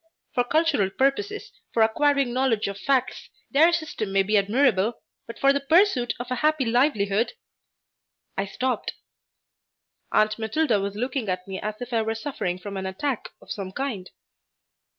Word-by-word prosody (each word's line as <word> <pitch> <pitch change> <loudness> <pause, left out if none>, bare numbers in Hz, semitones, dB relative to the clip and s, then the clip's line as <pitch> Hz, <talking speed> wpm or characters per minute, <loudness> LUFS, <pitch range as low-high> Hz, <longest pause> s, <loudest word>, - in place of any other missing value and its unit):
For 245 - +2
cultural 295 - +2
purposes, 400 - -1 0.2
for 225 - +5
acquiring 275 +2 +2
knowledge 250 -5 +1
of 200 0 -5
facts, 265 0 0 0.2
their 315 +4 +6
system 315 -11 -2
may 195 0 +3
be 210 +3 0
admirable, 220 +1 +2 0.3
but 230 - -8
for 275 0 +4
the 280 - +1
pursuit 295 - +3
of 245 +1 -6
a 255 - 0
happy 305 -3 +2
livelihood 230 -3 +2 0.5
" - - -56
I 195 - -1
stopped. 250 +3 -2 1.2
Aunt 215 +1 +2
Matilda 225 0 +1
was 200 0 -3
looking 245 0 -2
at 180 0 -3
me 190 -1 -5
as 215 0 -4
if 245 0 -6
I 225 - +3
were 220 0 -2
suffering 220 -7 -3
from 200 +1 -7
an 190 0 -3
attack 240 +7 -3
of - - -11
some 195 -2 -4
kind. 215 -6 -4
240 Hz, 165 wpm, -25 LUFS, 200-275 Hz, 1.2 s, their